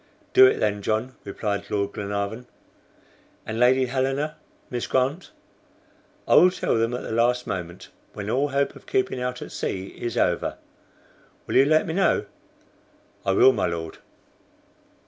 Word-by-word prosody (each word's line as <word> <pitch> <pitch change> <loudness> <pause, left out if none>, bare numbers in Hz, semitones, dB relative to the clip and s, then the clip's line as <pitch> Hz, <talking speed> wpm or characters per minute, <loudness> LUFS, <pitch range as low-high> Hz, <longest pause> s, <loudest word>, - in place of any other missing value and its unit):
"Do 390 0 +9
it - - +2
then, 105 -1 0
John," 110 +5 -1
replied 100 0 -4
Lord 100 -1 -1
Glenarvan. 100 +4 -4 1.0
"And 110 +1 -4
Lady 130 +2 +4
Helena, 135 +4 -1 0.4
Miss 120 -2 -3
Grant?" 135 +7 0 1.0
"I - - +3
will 180 - +8
tell 185 - -1
them 115 +2 0
at - - -5
the - - -6
last 120 +2 +1
moment 90 -1 -6 0.2
when 100 -1 -6
all 135 +6 +1
hope 140 0 -1
of - - -15
keeping 390 - 0
out 125 0 -3
at - - -10
sea 95 0 -4
is 120 -1 -4
over. - - 0 0.9
You - - -4
will 135 - +5
let 155 +1 +3
me 160 - -3
know?" 195 +3 +2 1.0
"I 95 - +3
will, 130 +7 +6
my - - 0
Lord." 85 -1 -5
125 Hz, 155 wpm, -24 LUFS, 100-135 Hz, 1.0 s, Do